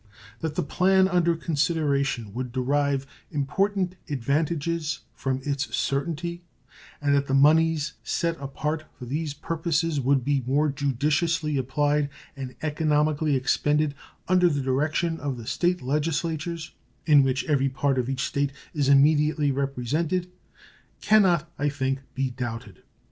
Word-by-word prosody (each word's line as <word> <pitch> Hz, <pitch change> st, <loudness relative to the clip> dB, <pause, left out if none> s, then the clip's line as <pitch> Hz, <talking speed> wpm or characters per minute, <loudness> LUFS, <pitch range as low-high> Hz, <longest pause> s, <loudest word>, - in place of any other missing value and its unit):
That 160 Hz, -2 st, -3 dB
the 180 Hz, -, 0 dB
plan 190 Hz, +5 st, +3 dB
under 175 Hz, -2 st, +2 dB
consideration 140 Hz, -, 0 dB
would 125 Hz, +1 st, -4 dB
derive 140 Hz, +2 st, 0 dB, 0.2 s
important 185 Hz, +5 st, 0 dB
advantages 155 Hz, +4 st, -1 dB
from 130 Hz, +3 st, -2 dB
its 140 Hz, 0 st, -2 dB
certainty, 170 Hz, +4 st, -2 dB, 0.6 s
and 145 Hz, -1 st, +1 dB
that 140 Hz, 0 st, +2 dB
the 135 Hz, -, +1 dB
moneys 155 Hz, +1 st, +4 dB
set 170 Hz, -2 st, -1 dB
apart 150 Hz, +3 st, -3 dB
for 125 Hz, -, -8 dB
these 145 Hz, +3 st, -3 dB
purposes 165 Hz, 0 st, -1 dB
would 135 Hz, -1 st, +2 dB
be 140 Hz, -1 st, +1 dB
more 145 Hz, +3 st, +2 dB
judiciously 150 Hz, +3 st, 0 dB
applied 145 Hz, +2 st, +1 dB, 0.3 s
and 130 Hz, -3 st, -7 dB
economically 150 Hz, -1 st, +1 dB
expended 145 Hz, +3 st, +1 dB, 0.3 s
under 180 Hz, -1 st, +4 dB
the 145 Hz, -3 st, -1 dB
direction 155 Hz, +5 st, 0 dB
of 140 Hz, -3 st, -3 dB
the 115 Hz, -, -8 dB
State 175 Hz, +6 st, 0 dB
legislatures, 160 Hz, +3 st, -2 dB, 0.3 s
in 150 Hz, -3 st, +7 dB
which 135 Hz, 0 st, +1 dB
every 135 Hz, -3 st, +2 dB
part 135 Hz, 0 st, 0 dB
of 125 Hz, 0 st, -1 dB
each 135 Hz, 0 st, -1 dB
State 140 Hz, 0 st, -1 dB, 0.2 s
is 145 Hz, -4 st, +1 dB
immediately 150 Hz, +1 st, +4 dB
represented, 145 Hz, +7 st, -1 dB, 0.7 s
can 215 Hz, 0 st, +5 dB
not, 170 Hz, -4 st, +2 dB
I 145 Hz, +1 st, +1 dB
think, 135 Hz, -1 st, -1 dB, 0.2 s
be 135 Hz, -1 st, -1 dB
doubted. 120 Hz, -5 st, -6 dB
145 Hz, 135 wpm, -25 LUFS, 135-165 Hz, 0.7 s, in